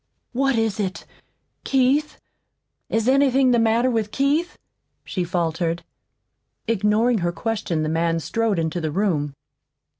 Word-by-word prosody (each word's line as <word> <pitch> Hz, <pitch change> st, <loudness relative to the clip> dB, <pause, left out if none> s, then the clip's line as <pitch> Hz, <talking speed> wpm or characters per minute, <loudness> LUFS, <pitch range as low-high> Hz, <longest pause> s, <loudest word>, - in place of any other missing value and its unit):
"What 270 Hz, +1 st, +1 dB
is 220 Hz, -2 st, 0 dB
it? 190 Hz, -2 st, -3 dB, 0.6 s
KEITH? 275 Hz, +3 st, +1 dB, 0.7 s
Is 225 Hz, +1 st, 0 dB
anything 265 Hz, -1 st, +4 dB
the 240 Hz, -, +3 dB
matter 230 Hz, +3 st, +2 dB
with 220 Hz, -3 st, -1 dB
Keith?" 295 Hz, +6 st, 0 dB, 0.5 s
she 185 Hz, -, -2 dB
faltered. 170 Hz, -1 st, -1 dB, 0.8 s
Ignoring 220 Hz, +2 st, +2 dB
her 175 Hz, -1 st, 0 dB
question 175 Hz, -4 st, -2 dB
the -, -, -1 dB
man 165 Hz, +1 st, 0 dB
strode 225 Hz, +4 st, -1 dB
into 165 Hz, +1 st, -1 dB
the 160 Hz, -, -1 dB
room. 150 Hz, -5 st, -1 dB
215 Hz, 125 wpm, -22 LUFS, 170-250 Hz, 0.8 s, anything